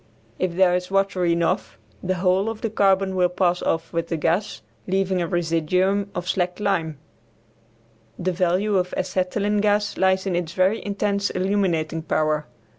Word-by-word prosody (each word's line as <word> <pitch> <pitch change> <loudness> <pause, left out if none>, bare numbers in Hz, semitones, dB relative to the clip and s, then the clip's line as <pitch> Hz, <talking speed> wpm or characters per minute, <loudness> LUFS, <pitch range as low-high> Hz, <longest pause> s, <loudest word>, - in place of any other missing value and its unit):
If 180 -2 -1
there 185 -1 +4
is 180 0 -1
water 195 -2 +1
enough 170 -10 0 0.2
the 185 0 -1
whole 185 +3 +1
of 225 -1 -6
the 225 - -2
carbon 195 -2 +2
will 180 -1 +3
pass 180 -1 +1
off 165 +1 -2
with 170 0 -1
the 165 - -2
gas, 170 +7 -1 0.2
leaving 190 -1 0
a 170 - -1
residuum 175 +4 0
of 175 0 -4
slacked 180 0 -1
lime. 165 -7 -1 1.2
The 185 +1 -1
value 185 +3 +1
of 180 0 -1
acetylene 190 +3 0
gas 205 0 +1
lies 190 0 +2
in 190 -3 -1
its 170 -1 -2
very 190 +4 +1
intense 200 0 -1
illuminating 185 -5 0
power. 155 -2 0
185 Hz, 160 wpm, -23 LUFS, 175-195 Hz, 1.2 s, there